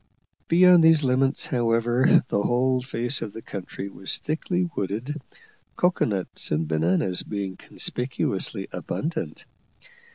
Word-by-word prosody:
Beyond 180 0 +6
these 160 -2 +6
limits, 130 +1 +1
however, 120 +1 +3
the 100 - 0
whole 125 +3 +1
face 125 0 -2
of 105 - -5
the 115 - -8
country 95 0 -6
was 95 -1 -3
thickly 175 +4 -2
wooded, 115 +10 -3 0.5
cocoa 180 0 +2
nuts 100 -4 -3
and 75 +1 0
bananas 85 +4 +1
being 100 -2 -4
conspicuously 125 +6 -2
abundant. 165 +3 -4
120 Hz, 120 wpm, -25 LUFS, 100-145 Hz, 0.5 s, Beyond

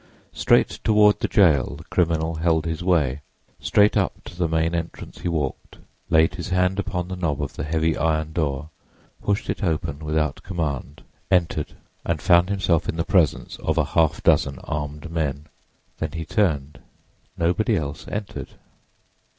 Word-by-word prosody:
Straight - - +2
toward 105 -1 +5
the - - 0
jail 75 -9 +3
the 80 - -11
criminal 80 -2 0
held 80 -1 +1
his 80 +1 -3
way. 75 -7 +1 0.4
Straight 105 0 +3
up - - +2
to - - -11
the 85 -1 0
main 80 +1 0
entrance 85 -1 -5
he - - -4
walked, 75 -6 -3 0.3
laid 80 +2 +4
his 90 0 -6
hand 90 +1 +1
upon 90 -2 -2
the 95 - -5
knob 80 -6 -1
of 70 -2 -3
the - - -4
heavy 80 +1 +1
iron 80 0 0
door, 75 -2 -2 0.5
pushed 100 0 -1
it - - -3
open 80 -5 -1
without 75 -2 -1
command, 75 -6 -4 0.3
entered 85 -5 +1 0.3
and 85 -2 -1
found 85 +2 +4
himself 95 -5 +1
in - - -2
the 85 0 -1
presence 90 -6 +1
of - - -1
a - - +3
half 80 -2 +2
dozen 70 -1 +3
armed 75 +2 -5
men. 75 -3 -2 0.5
Then 80 -2 -3
he 80 -1 -4
turned. 75 -10 0 0.6
Nobody 90 +6 +1
else 70 -2 -5
entered. 105 -1 -5
80 Hz, 160 wpm, -23 LUFS, 75-90 Hz, 0.6 s, toward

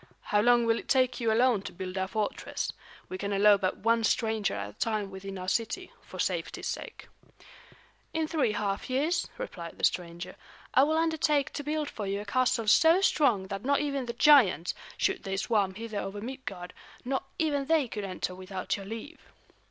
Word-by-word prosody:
"How 205 - +5
long 240 +1 +4
will 230 0 +2
it - - -11
take 255 -1 +3
you 230 -2 +1
alone 235 -2 +3
to - - -7
build 185 0 -6
our 190 0 -1
fortress? 210 +2 -3 0.3
We 185 - -6
can 200 0 -3
allow 205 +1 +6
but 190 -2 -1
one 230 +1 +2
stranger 220 - +1
at 100 0 -4
a - - -28
time 215 -3 -1
within 195 0 -7
our 185 0 -6
city, 230 - -1
for - - -11
safety's - - -2
sake." - - -6 1.0
"In 320 -1 -1
three 280 -9 +1
half 200 +1 -2
years," 300 +7 +1
replied 175 - -7
the - - -12
stranger, 175 +1 -1 0.4
"I 260 - +6
will 315 +2 +1
undertake 315 -3 +1
to 290 - -4
build 300 +1 -1
for 210 -7 -5
you 200 +1 -1
a 205 - -6
castle 250 -2 +1
so 325 - +6
strong 245 - +3
that 195 0 -4
not 280 +2 +2
even 280 -3 -2
the 235 - -3
giants, 235 - +5 0.2
should 385 - +1
they 195 -2 -3
swarm 200 -2 +1
hither 220 -1 -4
over 195 +1 -5
Midgard, 205 -7 -7 0.3
not 265 +1 -1
even 290 -4 0
they 315 -3 +2
could 210 -2 -5
enter 185 -1 -3
without 185 0 -4
your 195 -1 -8
leave." 230 +9 -8
220 Hz, 190 wpm, -29 LUFS, 195-275 Hz, 1.0 s, allow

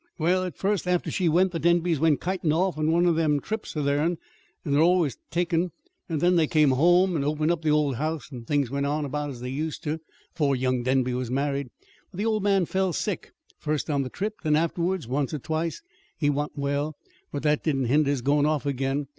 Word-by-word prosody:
"Well, 180 +3 +2
at 180 - -6
first, 195 -2 0
after 180 -1 0
she 180 -3 +1
went, 180 +4 +3
the 165 - -3
Denbys 170 -1 +2
went 155 -2 +3
kitin' 180 -3 0
off 180 +4 +1
on 155 +1 +1
one 170 +2 +3
o' 175 - +4
them 155 -3 +2
trips 215 -1 -5
o' 150 - 0
theirn, 145 +5 +1 0.5
that 145 - -3
they're 145 +2 +4
always 170 -6 +3
takin'; 170 0 0 0.3
then 175 +2 +2
they 160 -2 +3
come 150 -3 +4
home 175 +6 +4
and 145 - 0
opened 155 +2 +1
up 170 -2 -1
the 160 - 0
old 150 -4 +2
house, 155 0 -3
and 120 -3 -9
things 140 -4 +1
went 140 0 -1
on 150 +1 -1
about 145 +1 -3
as 125 -4 -8
they 125 +1 -4
used 155 +3 -4
to 155 +1 -2 0.3
'fore 145 -5 +1
young 130 -1 0
Denby 130 0 +1
was 125 -1 -3
married. 140 0 -1 0.4
But 180 - -13
the 205 - -1
old 215 -2 +1
man 195 -2 +2
fell 190 +1 0
sick - - -3 0.3
first 150 0 -2
on 140 -1 +1
the 130 - -3
trip, 210 +7 -4
then 155 -3 +2
afterwards, 170 -1 0
once 140 +4 -1
or - - -4
twice. 160 - -3 0.3
He 145 -2 +2
wa'n't 145 +1 -3
well; 145 +2 -1 0.4
but 145 - -4
that 150 -1 +2
didn't 135 -5 0
hinder 145 +4 +3
his 140 -4 -1
goin' 145 +2 +3
off 155 -2 0
again. 135 +1 -1
155 Hz, 225 wpm, -26 LUFS, 140-170 Hz, 0.5 s, o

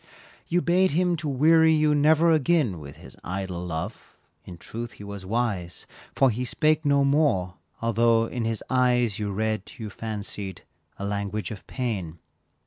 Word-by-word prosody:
You 175 +1 +1
bade 185 +2 +3
him 175 +3 +2
to 155 -2 -3
weary 160 +4 +5
you, 150 -1 +3
never 155 +3 +4
again 150 - +2
With 70 -1 -10
his - - -13
idle 90 -1 -4
love, 80 -2 -6 0.3
in 90 - -10
truth 115 +6 -7
he - - -12
was 100 -2 -8
wise, 100 -6 -2 0.3
For 135 -2 +4
he 120 +3 -3
spake 155 +4 +1
no 140 -1 +3
more, 140 - +2 0.3
although 115 0 +3
in 120 0 -4
his 115 -1 -2
eyes 125 -4 +2
You 105 -1 -2
read, 110 0 -2
you 110 -4 -6
fancied, 100 -3 -5 0.3
a 100 - -5
language 100 +1 -3
of 105 - -9
pain. 100 -11 -3
115 Hz, 160 wpm, -25 LUFS, 100-145 Hz, 0.3 s, weary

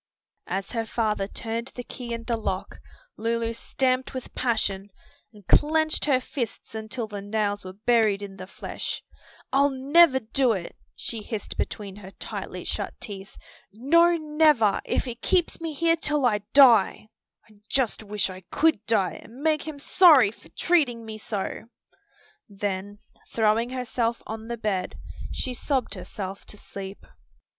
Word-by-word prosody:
As 195 +1 -3
her 225 -1 -2
father 210 -4 0
turned 230 +3 -4
the 245 - -5
key 245 -1 -8
in 230 0 -3
the 235 0 0
lock, 195 -4 -3 0.4
Lulu 230 0 -1
stamped 260 +2 -1
with 260 - -6
passion, 205 -5 -1 0.4
and 210 -4 -17
clenched 315 - +3
her 275 -4 +4
fists 250 -4 -5
until 220 +2 -4
the 205 -2 -6
nails 205 0 -1
were 185 0 -8
buried 215 -1 +2
in 195 -1 -8
the 185 0 -8
flesh. - - -5 0.5
"I'll 280 +1 +5
never 280 +2 +5
do 245 +1 +2
it!" 180 -4 -5 0.2
she 225 -2 -5
hissed 210 0 -5
between 200 -2 -4
her 190 -2 -10
tightly - - -6
shut - - -3
teeth, 195 -2 -8 0.3
"no, 335 - +4
never! 300 -9 +3
if - - 0
he 245 - -3
keeps 345 +8 +1
me 325 -1 -3
here 330 +3 +2
till 300 -4 0
I 215 -4 +3
die. 235 -6 +6 0.4
I 215 -2 -21
just 260 -5 +1
wish 210 -2 -1
I 185 -1 -8
could 315 -9 +2
die 205 -5 +1
and 250 +6 -12
make 315 -1 +1
him 310 -2 -5
sorry 285 - +6
for - - -19
treating 265 -10 +1
me 215 -1 -7
so!" 210 0 -4 0.8
Then 200 0 -3 0.3
throwing 225 +1 +2
herself 240 -2 -1
on 220 0 -6
the 235 0 -3
bed 200 -5 -2 0.4
she 255 - -3
sobbed 255 -3 -1
herself 195 0 -6
to 210 - -8
sleep. 195 -1 -8
230 Hz, 155 wpm, -26 LUFS, 205-265 Hz, 0.8 s, die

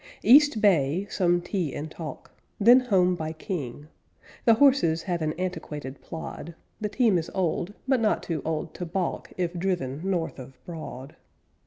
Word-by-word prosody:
East 280 +1 +6
Bay, 175 -3 +3
some 175 -2 +2
tea 175 -5 -2
and 155 +2 -5
talk, 160 -2 -8 0.3
them 240 +5 +8
home 190 -8 +2
by 160 -2 -4
King. 150 - -5 0.6
The 230 - +7
horses 235 - +4
have 175 -3 -2
an 155 -1 0
antiquated 155 -6 -5
plod; 165 0 -7 0.2
The 210 -1 -2
team 220 -6 +3
is 160 - -5
old, 185 +1 -1
but 265 -2 +3
not 220 -2 +1
too 160 -4 -3
old 160 0 -3
to 180 - -5
balk 180 +1 -3
If 175 -1 -1
driven 170 -7 -2
north 180 -6 -2
of 130 0 -11
Broad. 155 -5 -8
175 Hz, 160 wpm, -26 LUFS, 155-200 Hz, 0.6 s, them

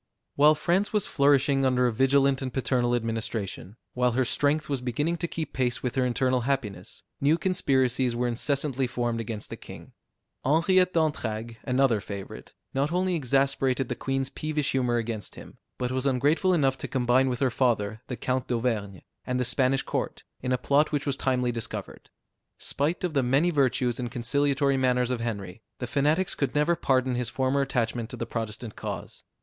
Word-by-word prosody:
While 150 +2 +6
France 180 +6 +1
was 210 -3 +1
flourishing 140 -1 +3
under 125 -1 +3
a 120 - +1
vigilant 135 +2 +3
and 130 -1 -3
paternal 125 -2 +1
administration, 110 -4 -3 0.2
while 125 -1 +1
her 130 +1 +2
strength 145 +5 +1
was 140 -3 -2
beginning 145 +8 -1
to 170 - -2
keep 165 -1 -5
pace 125 -2 -1
with 125 - -1
her 130 - +1
internal 125 0 +1
happiness, 115 -8 -3 0.2
new 150 +4 +4
conspiracies 130 -8 +1
were 120 +1 0
incessantly 135 +2 0
formed 120 -1 -2
against 110 -1 -5
the - - -5
king. - - -12 0.5
Henriette 180 +6 +3
d'Entragues, 115 -8 -1
another 125 -4 +2
favorite, 100 -2 -8 0.2
not 140 +3 0
only 180 +1 +1
exasperated 135 -3 +1
the - - -2
Queen's 135 0 -2
peevish 155 -2 -2
humor 125 -2 +1
against 115 -4 -4
him, - - -12 0.2
but 125 0 -2
was 130 +1 0
ungrateful 145 +8 +2
enough 135 -6 +2
to - - -4
combine 130 +1 +2
with 125 -1 -2
her 130 -3 +2
father, 110 -4 0
the 125 - -4
Count 130 +2 -1
d'Auvergne, 115 -6 -2 0.3
and 125 0 0
the 125 - +1
Spanish 130 +2 +1
Court, - - -3 0.2
in 125 - -2
a 125 - +3
plot 140 +4 +2
which 145 -2 -1
was 140 -2 0
timely 125 -2 0
discovered. 115 -3 -6 0.5
Spite 150 +6 -2
of 180 -3 -1
the 140 - +3
many 135 +8 +2
virtues 130 -4 +1
and 120 -1 -3
conciliatory 140 +3 +1
manners 125 -1 +2
of 125 - -1
Henry, 100 -4 -5 0.2
the 125 - -4
fanatics 150 +9 +1
could 140 -1 -2
never 150 +4 +3
pardon 130 -5 +1
his 120 -1 -1
former 135 +1 +1
attachment 120 -3 -1
to 125 - -7
the 115 - -3
Protestant 115 -1 -5
cause. - - -6
130 Hz, 180 wpm, -27 LUFS, 120-140 Hz, 0.5 s, While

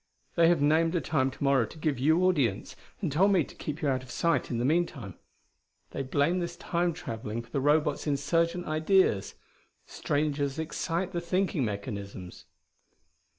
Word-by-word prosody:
They 170 -1 +4
have 165 -4 +3
named 165 +3 +3
a - - +3
time 140 -5 0
to 135 - -8
morrow 135 -5 +3
to - - -13
give 155 -5 -1
you 160 +6 +3
audience, 140 - 0 0.3
and - - -1
told 190 +8 +4
me 180 -4 +4
to - - -12
keep 155 +2 -6
you - - +2
out 130 -2 +1
of 130 - -14
sight 170 +5 0
in 120 - -2
the 120 - 0
meanwhile. 145 - 0 0.8
They - - -3
blame 145 +6 +1
this 170 -1 -4
Time 175 0 0
traveling 115 -8 -5
for 115 - -21
the 140 - -1
Robots' 150 +1 +1
insurgent 165 +5 0
ideas. 155 - +2 0.5
Strangers 145 -1 -1
excite 170 +3 -2
the 175 -2 -2
thinking 180 -3 0
mechanisms." 100 -4 -6
150 Hz, 170 wpm, -28 LUFS, 130-170 Hz, 0.8 s, They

